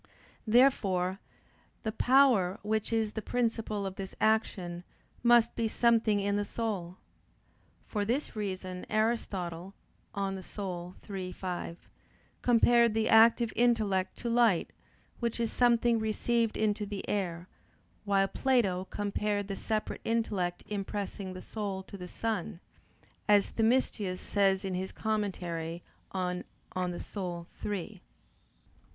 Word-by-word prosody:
Therefore 195 -6 +3 0.6
the 220 - -1
power 235 -6 +4
which 215 +1 -1
is 220 -2 +1
the 220 - -3
principle 225 -3 -1
of 190 0 -5
this 195 -1 -6
action 185 -5 +1 0.4
must 240 -1 +5
be 230 - 0
something 225 -2 +3
in 200 0 0
the 205 - +1
soul. 200 -5 -3 0.9
For 210 -2 -2
this 245 +7 -1
reason 185 -3 -4
Aristotle 195 -5 -1 0.4
(De - - -3
Anima 190 -2 -4
iii, 190 -3 -4
5) 180 -2 -5 0.5
compared 235 -1 +5
the 220 0 +1
active 225 +1 +6
intellect 215 -6 +2
to 240 - -5
light, 230 -6 +3 0.5
which 235 -1 -2
is 230 -1 0
something 235 -1 +4
received 225 +1 0
into 210 -1 0
the 200 -1 -5
air: 180 -3 -2 0.6
while 195 -1 +3
Plato 200 -8 +1
compared 205 0 -2
the 195 - -3
separate 215 +2 -2
intellect 205 -6 -1
impressing 200 -1 -4
the 185 - -8
soul 200 -3 -4
to 195 - -11
the 180 -2 -7
sun, 215 -2 -3 0.7
as 205 -1 +5
Themistius 220 -5 +1
says 195 -1 +1
in 190 - -2
his 185 +1 -3
commentary 175 -6 -2 0.3
on 180 -1 -2 0.3
De 180 -1 -2 0.2
Anima 175 -4 -3 0.2
iii. 200 -1 -4
205 Hz, 120 wpm, -30 LUFS, 185-225 Hz, 0.9 s, active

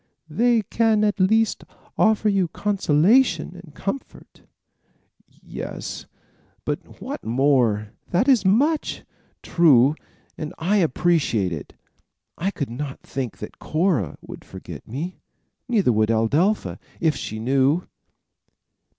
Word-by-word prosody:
"They 235 +6 +3
can 220 +1 +2
at 210 -1 +1
least 220 +4 +2 0.3
offer 220 0 +3
you 195 -3 +2
consolation 185 - +2
and 150 -5 -16
comfort." 230 +8 -6 0.9
"Yes; - - -7 0.6
but - - -5
what 280 +3 -6
more?" 115 -4 +2 0.2
"That 190 +9 +1
is 255 -7 +5
much." 280 +11 +1 0.4
"True; 145 -6 +5 0.5
and 155 -1 -5
I 195 +6 +1
will 175 - +4
appreciate 145 - +1
it. 75 - -8 0.6
I 185 - -1
could 140 - -4
not 135 +2 -6
think 130 -4 -5
that 105 - -9
Cora 155 - 0
would - - -10
forget - - -10
me. 150 +11 -5 0.5
Neither 210 - +3
would 110 0 +2
Adelpha, 145 - +1 0.2
if 160 -2 +2
she 110 - -5
knew." 135 +8 +2
170 Hz, 115 wpm, -23 LUFS, 130-210 Hz, 0.9 s, is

